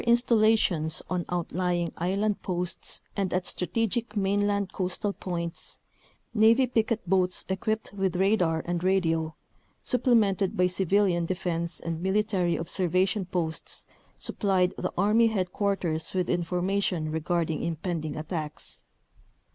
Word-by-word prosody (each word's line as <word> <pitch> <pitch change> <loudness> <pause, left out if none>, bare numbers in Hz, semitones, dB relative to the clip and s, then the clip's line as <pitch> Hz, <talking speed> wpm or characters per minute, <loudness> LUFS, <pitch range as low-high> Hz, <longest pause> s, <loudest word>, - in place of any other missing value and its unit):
Radar 235 - +4
installations 215 -9 +3
on 180 -1 -1
outlying 175 -1 -1
island 195 +4 0
posts 180 -1 -2
and 195 -3 -1
at 180 0 0
strategic 225 +4 -1
main 200 +1 +2
land 200 -1 -1
coastal 195 +2 -2
points, 170 -3 -4 0.6
Navy 230 +4 +5
picket 225 -4 0
boats 180 0 +2
equipped 215 +3 -2
with 195 -2 -1
radar 180 -4 +2
and 175 0 -2
radio, 165 -4 +1 0.5
supplemented 210 -7 +2
by 180 - +4
civilian 180 -1 +2
defense 170 -2 -1
and 165 0 -4
military 190 -2 +1
observation 185 +3 0
posts, 170 -3 -3 0.3
supplied 190 -3 +1
the 180 - -3
Army 215 +5 +4
headquarters 185 -5 -1
with 180 -1 +1
information 180 -1 0
re 160 - -1
garding 165 -1 -1
impending 165 -2 -3
attacks. 155 -1 -4
185 Hz, 120 wpm, -27 LUFS, 170-205 Hz, 0.6 s, Navy